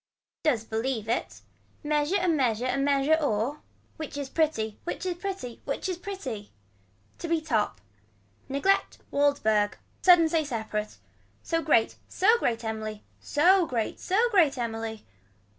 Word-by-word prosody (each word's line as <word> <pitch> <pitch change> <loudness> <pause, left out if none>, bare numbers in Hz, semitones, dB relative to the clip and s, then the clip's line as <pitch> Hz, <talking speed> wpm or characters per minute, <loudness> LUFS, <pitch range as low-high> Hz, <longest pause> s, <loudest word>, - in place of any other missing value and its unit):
Does 250 -8 +1
believe 225 0 -2
it. 235 - -2 0.4
Measure 300 +5 +1
a 365 - 0
measure 255 -8 +1
a 255 - 0
measure 275 +2 +2
or. 265 +2 -1 0.4
Which 310 -2 -6
is 280 -2 -5
pretty 225 -10 0
which 350 - -4
is 360 -1 -1
pretty 355 -10 -6
which 275 - -3
is 365 -2 -3
pretty. 275 - -6 0.7
To 340 - -4
be 330 0 +2
top. 230 - -1 0.7
Neglect 280 +9 +1
Waldberg. 220 -8 +2 0.2
Sudden 350 -3 +7
say 320 0 +1
separate. 220 -5 -4 0.5
So 330 -1 0
great 290 -8 +2
so 445 +5 +3
great 235 - 0
Emily. 215 -1 -4 0.2
Sew 355 +4 +4
grate 230 -3 -2
sew 430 +6 +2
grate 330 - +4
Emily. 225 -2 -4
280 Hz, 140 wpm, -27 LUFS, 225-330 Hz, 0.7 s, Sudden